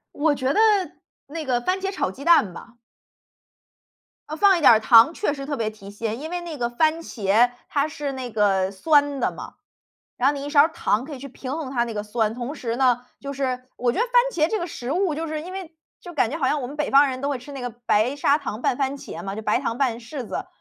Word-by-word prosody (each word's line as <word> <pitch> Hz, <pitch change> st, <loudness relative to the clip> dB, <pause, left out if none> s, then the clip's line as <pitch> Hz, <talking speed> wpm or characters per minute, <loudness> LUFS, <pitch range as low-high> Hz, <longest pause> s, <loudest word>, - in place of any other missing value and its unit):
我 295 Hz, +1 st, +2 dB
觉 260 Hz, -1 st, 0 dB
得， -, -, +1 dB, 0.7 s
那 315 Hz, +3 st, -5 dB
个 250 Hz, -3 st, +1 dB
番 370 Hz, +7 st, 0 dB
茄 390 Hz, 0 st, -2 dB
炒 390 Hz, -, -1 dB
鸡 260 Hz, +9 st, -10 dB
蛋 320 Hz, -, +4 dB
吧。 235 Hz, +7 st, -12 dB, 1.5 s
呃， 310 Hz, -, -4 dB
放 390 Hz, +2 st, +5 dB
一 335 Hz, -, -3 dB
点 -, -, +8 dB
儿 220 Hz, -, +4 dB
糖 230 Hz, +6 st, +6 dB
确 375 Hz, -, -1 dB
实 275 Hz, -1 st, -6 dB
特 290 Hz, 0 st, -3 dB
别 225 Hz, -4 st, -1 dB
提 215 Hz, -2 st, -12 dB
鲜， 220 Hz, +2 st, -4 dB
因 315 Hz, +3 st, -7 dB
为 355 Hz, 0 st, -3 dB
那 335 Hz, -3 st, -7 dB
个 240 Hz, -2 st, 0 dB
番 315 Hz, +6 st, +1 dB
茄 225 Hz, -3 st, +2 dB, 0.2 s
它 285 Hz, +1 st, +1 dB
是 290 Hz, -2 st, -4 dB
那 255 Hz, -2 st, -6 dB
个 195 Hz, -3 st, +2 dB
酸 285 Hz, +6 st, +2 dB
的 -, -, +1 dB
嘛， -, -, -9 dB, 0.7 s
然 255 Hz, -, +3 dB
后 290 Hz, -, +1 dB
你 280 Hz, 0 st, -5 dB
1 290 Hz, -, -5 dB
勺 290 Hz, +1 st, +6 dB
糖 230 Hz, -7 st, -1 dB
可 300 Hz, -, -7 dB
以 -, -, -9 dB
去 275 Hz, +2 st, -8 dB
平 255 Hz, 0 st, -8 dB
衡 310 Hz, -5 st, -5 dB
它 240 Hz, -3 st, +1 dB
那 230 Hz, -2 st, -6 dB
个 210 Hz, -, -2 dB
酸。 215 Hz, +1 st, -1 dB
同 250 Hz, +4 st, -5 dB
时 235 Hz, -6 st, -4 dB
呢， 250 Hz, -1 st, +2 dB
就 280 Hz, 0 st, -5 dB
是 260 Hz, -2 st, -2 dB
我 245 Hz, 0 st, +1 dB
觉 235 Hz, -, -3 dB
得 470 Hz, -, +3 dB
番 -, -, -11 dB, 0.2 s
茄 315 Hz, -4 st, +1 dB
这 440 Hz, -, 0 dB
个 345 Hz, -, -3 dB
食 255 Hz, -5 st, -5 dB
物， 360 Hz, -1 st, +1 dB
就 320 Hz, +2 st, -3 dB
是 310 Hz, -1 st, -4 dB
因 340 Hz, +4 st, -8 dB
为 360 Hz, -4 st, -7 dB, 0.2 s
就 350 Hz, -, -10 dB
感 250 Hz, -7 st, +1 dB
觉 310 Hz, -, -3 dB
好 275 Hz, -, 0 dB
像 290 Hz, +3 st, +1 dB
我 250 Hz, -, -4 dB
们 285 Hz, +4 st, -9 dB
北 300 Hz, -1 st, -1 dB
方 280 Hz, +1 st, +6 dB
人 260 Hz, 0 st, -5 dB
都 280 Hz, -, 0 dB
会 275 Hz, -, -2 dB
吃 255 Hz, +4 st, -11 dB
那 270 Hz, -2 st, -7 dB
个 245 Hz, -, -3 dB, 0.2 s
白 220 Hz, +6 st, +2 dB
砂 285 Hz, 0 st, +3 dB
糖 250 Hz, -7 st, -5 dB
拌 250 Hz, -, +1 dB
番 275 Hz, +1 st, -1 dB
茄 170 Hz, -, -8 dB
嘛， 195 Hz, +1 st, -5 dB
就 215 Hz, -, -5 dB
白 210 Hz, -1 st, +1 dB
糖 230 Hz, -, -3 dB
拌 245 Hz, -4 st, 0 dB
柿 245 Hz, +1 st, -7 dB
子， -, -, -4 dB
275 Hz, 280 characters per minute, -23 LUFS, 235-305 Hz, 1.5 s, 点